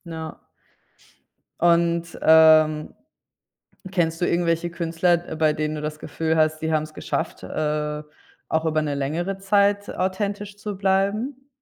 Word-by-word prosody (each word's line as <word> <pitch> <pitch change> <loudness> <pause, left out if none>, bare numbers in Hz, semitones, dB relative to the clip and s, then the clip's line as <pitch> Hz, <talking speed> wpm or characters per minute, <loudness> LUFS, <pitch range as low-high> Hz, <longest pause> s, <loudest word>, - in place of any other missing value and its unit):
Na. 160 -2 -7 1.2
Und, 170 0 +2
ähm, 155 -1 +5 1.0
kennst 165 -3 0
du - - +3
irgendwelche 170 0 0
Künstler, 170 +1 0
äh, - - -5
bei 155 -1 +2
denen 155 0 -2
du 150 - -5
das 150 0 -5
Gefühl 160 +2 -2
hast, 155 0 +2
die 160 0 -1
haben's 155 0 -1
geschafft, - - -4
äh, 150 0 -2 0.5
auch 160 0 0
über 155 -1 +1
'ne 145 -2 -2
längere 165 +8 -2
Zeit 200 +1 +2
authentisch 200 +2 -3
zu 205 -1 -6
bleiben? 210 +8 0
165 Hz, 135 wpm, -23 LUFS, 155-190 Hz, 1.2 s, ähm